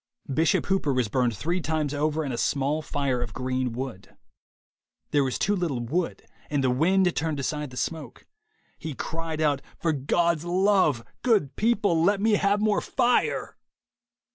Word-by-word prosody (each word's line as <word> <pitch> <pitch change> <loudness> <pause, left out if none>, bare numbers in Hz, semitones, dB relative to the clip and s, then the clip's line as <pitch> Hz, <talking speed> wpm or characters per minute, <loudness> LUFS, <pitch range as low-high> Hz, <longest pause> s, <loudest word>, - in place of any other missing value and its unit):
Bishop 160 +3 +2
Hooper 190 -6 +1
was 125 -4 0
burned 120 -1 +1
three 170 - -1
times 155 -3 -1
over 155 +2 0
in 135 - -3
a - - -2
small 145 +3 0
fire 140 -5 -1
of 115 -4 -5
green 130 -1 -1
wood. 125 -5 -7 1.0
There 145 -1 +3
was 130 -2 -1
too 205 +1 +1
little 170 -9 -1
wood, 160 +10 -2 0.2
and 145 -2 0
the 130 - +3
wind 180 +7 +2
turned 160 -3 -1
aside 150 +1 -2
the 125 - -11
smoke. 160 +1 -4 0.5
He 155 -4 -5
cried 160 +1 -4
out, 145 -3 +2 0.2
'For 165 -2 0
God's 160 +3 +1
love, 180 - +2 0.2
good 205 - +2
people, 210 -7 +2
let 200 +4 +3
me 220 +2 +2
have 205 0 +2
more 215 -1 +2
fire.' 245 -1 0
155 Hz, 165 wpm, -26 LUFS, 135-180 Hz, 1.0 s, There